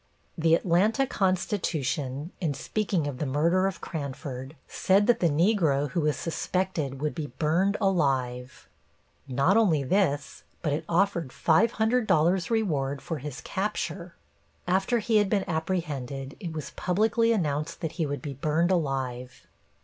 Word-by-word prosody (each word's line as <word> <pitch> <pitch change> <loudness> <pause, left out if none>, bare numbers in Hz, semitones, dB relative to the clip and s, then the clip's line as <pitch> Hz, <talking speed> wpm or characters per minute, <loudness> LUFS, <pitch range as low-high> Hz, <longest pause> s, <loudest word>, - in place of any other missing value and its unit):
The 165 -1 +4
Atlanta 195 +11 +2
Constitution, 165 - -1
in 155 -5 0
speaking 190 +1 -1
of 140 -3 -4
the - - -1
murder 170 +7 +2
of 195 - -5
Cranford, 140 -3 -6
said 195 +2 +2
that 240 - +3
the 170 - +3
Negro 155 - +2
who 170 - 0
was 150 -1 +1
suspected 165 -5 -2
would 150 +1 -1
be 155 -3 -4
burned 180 +6 +2
alive. 135 - 0 0.6
Not 140 - +3
only 170 -11 +3
this, 145 -2 0 0.2
but 150 -3 +1
it 155 +2 -3
offered 170 -4 +1
$500 195 - +2
reward 150 -12 0
for 155 +3 -5
his 140 -1 -7
capture. 185 -3 -3 0.5
After 190 +6 +2
he 225 0 +2
had 205 -2 +3
been 200 -2 0
apprehended, 150 -6 -3
it 175 -6 -5
was 155 -1 -6
publicly 225 +5 +1
announced 155 -7 -1
that 160 -3 -2
he 155 - +1
would 145 +2 -4
be 145 -3 -4
burned 155 +6 +1
alive. 130 -6 -2
165 Hz, 140 wpm, -27 LUFS, 140-190 Hz, 0.6 s, The